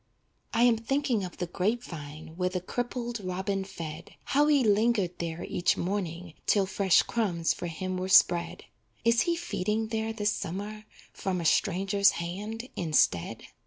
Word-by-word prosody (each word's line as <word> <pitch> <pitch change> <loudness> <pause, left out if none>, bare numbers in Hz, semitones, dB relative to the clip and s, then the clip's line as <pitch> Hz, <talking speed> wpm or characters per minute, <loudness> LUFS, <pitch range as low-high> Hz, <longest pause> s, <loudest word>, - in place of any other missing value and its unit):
I 230 +1 +3
am 240 -2 +5
thinking 245 -2 0
of 180 - -7
the 180 - -2
grape 210 +7 -1
vine 155 -2 -9
Where 180 +1 0
the 180 0 -2
crippled 240 +4 -3
robin 190 +1 -2
fed, 165 -3 -8
How 290 +2 +3
he 290 -3 +4
lingered 210 -4 +2
there 165 0 -4
each 175 - +1
morning 175 -3 -3
'Till 200 -2 +4
fresh 190 -1 +3
crumbs 180 -8 0
for 175 - -5
him 185 +3 -4
were 185 +1 -3
spread. 175 -2 +4 0.4
Is 230 0 +4
he 340 - +2
feeding 220 - -2
there 220 0 -1
this 210 -2 0
summer 210 +4 -5 0.3
From 185 -2 -2
a 170 - -4
stranger's 195 +4 +3
hand, 210 +8 -5
instead? 150 - +1
195 Hz, 160 wpm, -28 LUFS, 175-225 Hz, 0.4 s, am